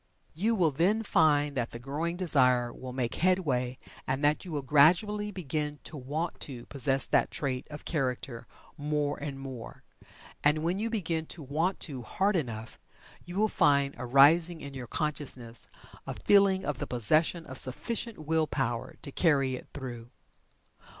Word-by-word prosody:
You 215 +8 +1
will 170 -6 +3
then 190 +10 +2
find 145 -6 +3
that 120 -3 -1
the - - -8
growing 150 +8 -3
desire 125 -9 +3
will 130 -1 -8
make 125 -2 -2
headway 140 -9 +1 0.3
and 135 +2 -1
that 150 +1 +2
you 180 - -8
will 145 -3 -3
gradually 180 +10 +4
begin 150 -5 -3
to - - -8
"want 150 +5 -4
to" 125 -4 -7
possess 135 -1 +4
that - - +2
trait 130 -3 -3
of 150 -1 -9
character 130 -5 -3 0.3
more 145 -1 -1
and 140 -2 -5
more. 130 -4 -8 0.6
And 150 +1 +3
when 175 +4 0
you 225 +2 -1
begin 165 -8 -2
to 165 - -7
"want 160 +8 -1
to" 135 -6 -2
hard 195 - 0
enough, 115 -8 -4 0.5
you 175 +1 -8
will 215 +2 +3
find 140 -7 +2
arising 145 +7 +4
in 140 -2 -8
your 130 -2 -7
consciousness 135 -6 -1 0.4
a - - -4
feeling 195 -2 +4
of 145 -4 -3
the - - -3
possession 155 - +2
of 130 0 -6
sufficient 225 - -2
Will 160 0 0
power 120 -5 -2
to 140 - -5
carry 140 -5 +2
it 125 - -7
through. 120 -4 -7
145 Hz, 165 wpm, -29 LUFS, 130-170 Hz, 0.6 s, gradually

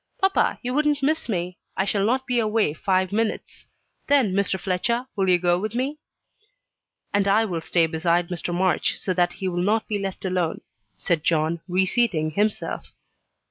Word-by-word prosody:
"Papa, 385 0 +2
you 250 +1 -2
wouldn't 295 0 +1
miss 310 -1 0
me 180 -3 -3 0.2
I 195 - +1
shall 200 0 0
not 255 +5 +1
be 250 -2 +1
away 215 -7 +1
five 185 +3 0
minutes. 220 +1 -3 0.4
Then, 265 -9 +3
Mr. 195 -1 0
Fletcher, 220 +7 -1
will 195 -2 +1
you 180 - +6
go 175 0 +2
with 215 +3 -4
me?" 275 +5 -2 1.1
"And 200 0 +2
I 215 +3 +4
will 175 -6 -3
stay 165 +1 +2
beside 170 +2 0
Mr. 175 -1 -4
March, 180 0 +1
so 185 - -2
that 175 0 +1
he 190 - -4
will 175 -1 -1
not 215 +4 +1
be 210 -2 -2
left 195 -1 -5
alone," 180 -3 -1 0.4
said 165 - 0
John, 160 0 +1
reseating 185 -3 +1
himself. 205 +5 -1
190 Hz, 175 wpm, -24 LUFS, 175-225 Hz, 1.1 s, you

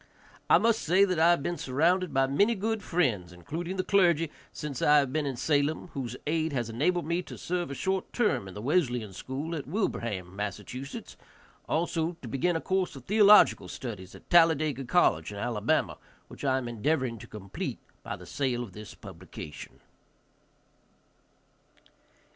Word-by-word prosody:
I - - +8
must 230 -1 +2
say 185 +5 +4
that 185 -4 -1
I 165 +1 +6
have 175 -5 +3
been 175 - -2
surrounded 170 +6 +1
by 135 0 +3
many 200 +13 +2
good 220 +2 -1
friends, 120 - 0
including 165 - -5
the 185 - 0
clergy, 170 -6 +3 0.2
since 145 -4 -6
I 150 0 +6
have 140 -2 +2
been 155 -2 0
in 135 - -2
Salem, 145 +5 0
whose 125 -3 -4
aid 160 0 0
has 120 -4 -2
enabled 170 +9 +1
me 170 +2 0
to - - -10
serve 175 -2 -2
a 140 - -5
short 190 +4 -2
term 210 - +1
in 95 - -10
the 105 - -7
Wesleyan 125 - 0
school 140 - -5
at 145 - -5
Wilbraham, 115 - -2
Mass., 100 0 -3 1.1
also 165 0 0
to - - -6
begin 160 +9 0
a 165 - -1
course 190 -3 -1
of 130 -2 -11
theological 210 - +6
studies 100 -2 -7
at - - -15
Talladega 155 -5 +4
college 120 - +2
in 100 - -7
Alabama, 105 -1 0 0.3
which - - -11
I 130 -2 +2
am 130 -2 -3
endeavoring 120 0 -1
to - - -11
complete 100 -3 -6 0.2
by - - -5
the - - -12
sale 125 -3 -1
of 105 -6 -10
this 105 +1 -10
publication. 90 -6 -10
145 Hz, 170 wpm, -28 LUFS, 120-175 Hz, 1.1 s, I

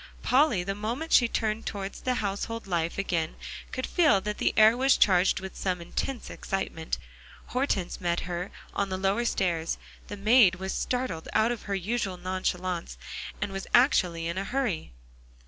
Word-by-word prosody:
Polly, 255 - +3
the 195 +2 -2
moment 235 +11 -3
she 240 - +7
turned 220 -1 -1
towards 200 -1 -5
the 255 -1 0
household 210 +2 -3
life 170 -3 -1
again, 170 -5 -1 0.4
could 255 - -2
feel 310 - +4
that 210 +1 -4
the - - +2
air 220 +1 +7
was 265 +2 +4
charged 185 -2 +4
with 190 0 -8
some 185 -2 -1
intense 230 +8 -4
excitement. 175 -4 -3 0.5
Hortense 245 -11 -1
met 175 -1 0
her 175 +1 -4 0.2
on 200 - -1
the 185 - -2
lower 195 +5 +1
stairs; 170 -7 0 0.3
the 205 - -6
maid 215 -2 +6
was 190 +1 -4
startled 250 -10 -2
out 220 +2 +3
of 240 - -4
her 200 - +1
usual 195 0 -2
nonchalance, 180 - -2 0.4
and 200 - -2
was 195 0 -5
actually 180 - +3
in 170 +2 -2
a - - -2
hurry. 245 - -2
195 Hz, 165 wpm, -28 LUFS, 180-235 Hz, 0.5 s, she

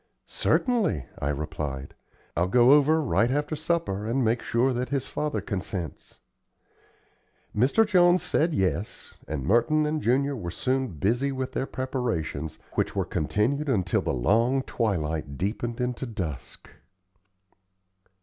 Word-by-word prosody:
"Certainly," 210 - +1
I 70 - -1
replied; 70 -2 -4 0.4
"I'll 85 +3 +2
go 120 +6 +5
over 150 +2 +5
right 115 -3 +2
after 145 +3 -1
supper, 155 - -1
and 125 +2 +1
make 115 +2 +1
sure 125 +3 +1
that 125 0 -2
his 135 -1 -1
father 150 -1 -2
consents." 95 -4 -5 1.4
Mr. 135 - +4
Jones 180 -3 +4
said, 165 +3 +1
"Yes," 95 +1 -2
and 70 -4 -3
Merton 150 - +3
and 150 0 -1
Junior 140 +4 +1
were 90 -8 -5
soon 130 +8 0
busy 115 - 0
with 130 -1 -3
their 135 - -2
preparations, 95 - -3 0.2
which - - -1
were - - 0
continued 125 - 0
until 95 -8 +1
the - - -1
long 115 - +2
twilight 80 - -2
deepened 115 - -2
into 125 +1 -2
dusk. 90 - -6
120 Hz, 130 wpm, -26 LUFS, 90-140 Hz, 1.4 s, go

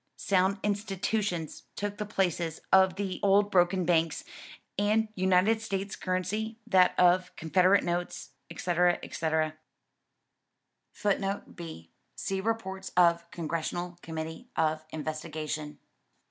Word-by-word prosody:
Sound 190 +1 +2
institutions 200 -4 -1
took 205 0 -4
the 210 - -3
places 175 -5 -1
of 190 -1 +6
the 190 -2 -3
old 200 +1 +4
broken 180 0 +3
banks, 165 - +2 0.6
and 215 +2 +2
United 190 +3 +3
States 195 -2 -3
currency 200 +5 -2
that 190 -5 +4
of 180 0 +4
Confederate 185 +5 +3
notes, 175 0 -3 0.2
etc. 175 0 +2
etc.[B] 155 -1 -1 1.4
[Footnote 200 -1 -1
B: 160 - -9 0.2
See 195 -1 -2
Reports 190 -3 -3
of 170 -1 +4
Congressional 175 +2 -3
Committee 160 +8 -6
of 155 -1 +1
Investigation. 155 -1 -4
185 Hz, 105 wpm, -29 LUFS, 165-200 Hz, 1.4 s, of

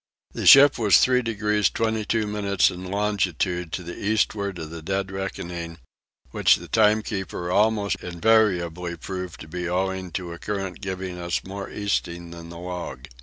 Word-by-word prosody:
The - - -2
ship 140 -1 +9
was 105 -5 +6
3 125 0 +4
degrees 105 -3 +1
22 110 0 0
minutes 100 -2 +1
in 90 +1 -7
longitude 95 -4 -1
to 90 - -3
the 85 +1 -7
eastward 100 -2 0
of 80 -1 -7
the 85 -1 -7
dead 95 +3 -2
reckoning, 85 -3 -5 0.5
which - - +4
the - - -9
timekeeper 105 -5 +1
almost 105 -1 +2
invariably 90 -3 +1
proved 90 0 -6
to - - -9
be 90 +2 -4
owing 95 0 -1
to 90 -2 -4
a 85 - -10
current 95 -3 -4
giving 95 -2 -5
us 85 0 -2
more 100 +1 -6
easting 85 -4 -3
than 85 0 -10
the 85 - -9
log. 90 -7 -6
95 Hz, 160 wpm, -24 LUFS, 85-105 Hz, 0.5 s, ship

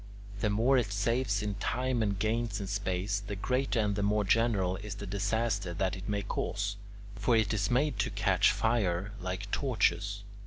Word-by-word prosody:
The 105 - +1
more 120 +6 +3
it 110 -4 -2
saves 105 0 0
in 105 -1 -1
time 125 +4 -1
and 100 -3 0
gains 110 +1 0
in 100 - -3
space, 100 0 -1
the 100 0 -6
greater 125 +4 0
and 105 -2 +1
the 100 - -1
more 105 +1 +2
general 100 -3 +2
is 100 0 -6
the 100 - -7
disaster 100 -1 -1
that 95 +2 0
it 95 +2 -7
may 100 -1 -1
cause; 100 0 -2 0.4
for 120 - +2
it 110 -1 +2
is 105 +1 0
made 130 +3 +1
to - - +1
catch - - +3
fire, 100 -4 0
like 95 +2 -4
torches. 100 -5 0
105 Hz, 185 wpm, -31 LUFS, 100-115 Hz, 0.4 s, more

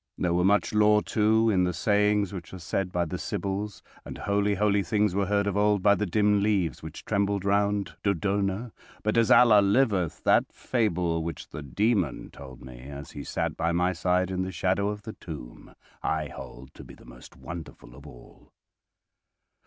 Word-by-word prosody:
There 85 -1 0
were 90 +1 +2
much 100 +3 +2
lore, 105 0 +4
too, 110 +1 +2
in 90 -3 +2
the 90 0 0
sayings 105 +2 +1
which 90 -4 -8
were 95 - -8
said 90 +2 -3
by 90 -1 0
the 80 - -5
Sybils, 100 +1 -4 0.2
and - - -8
holy, 100 0 0
holy 100 0 +2
things 105 +2 +1
were 100 0 0
heard 100 0 +1
of 100 -2 -1
old 105 -1 +2
by 100 - +6
the 105 0 -1
dim 105 +2 +2
leaves 100 -5 0
which 80 0 -9
trembled 100 -2 0
round 100 0 +1
Dodona, 100 +3 -1 0.3
but 105 - 0
as 115 -1 +3
Allah 115 -4 +7
liveth, 100 - +1
that - - +3
fable 90 -8 -1
which 85 0 -6
the 75 - -7
Demon 95 - -1
told 65 -2 -12
me 65 -1 -11
as 70 0 -9
he - - -7
sat - - -3
by 85 0 0
my 90 +2 +1
side 90 +2 0
in 95 0 -2
the 95 0 -3
shadow 95 +3 0
of 105 0 -6
the 110 - -7
tomb, 75 -8 -10 0.3
I 75 -2 -1
hold 65 +2 -11
to - - -12
be - - -13
the - - -18
most - - -14
wonderful 80 -7 -9
of 70 +2 -13
all." 60 -4 -16
100 Hz, 190 wpm, -27 LUFS, 85-105 Hz, 0.3 s, Allah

